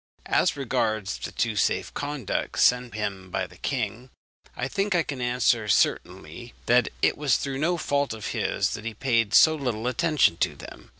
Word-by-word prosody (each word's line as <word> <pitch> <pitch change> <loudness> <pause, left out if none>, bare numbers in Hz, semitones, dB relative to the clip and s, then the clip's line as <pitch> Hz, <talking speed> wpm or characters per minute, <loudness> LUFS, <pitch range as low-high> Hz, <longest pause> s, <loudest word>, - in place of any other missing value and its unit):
As - - +1
regards 110 -6 -1
the - - -6
two 115 -2 -1
safe 95 - 0
conducts 145 -6 -2
sent 125 -2 +2
him 100 -3 -4
by 95 +1 -2
the - - -16
king, 125 -1 -3 0.5
I 125 - -2
think 195 +6 -1
I 170 - +3
can 140 -5 -6
answer 120 -2 +1
certainly 100 +2 -1
that 125 +1 +3
it - - +2
was 145 -4 +2
through 135 -1 -4
no 170 +4 +1
fault 140 -3 0
of 110 -1 -5
his - - 0
that 105 - -5
he 115 -1 -5
paid 115 -3 +1
so 160 - +7
little 125 -7 -3
attention 145 - +2
to - - 0
them. - - -12
125 Hz, 180 wpm, -25 LUFS, 110-140 Hz, 0.5 s, so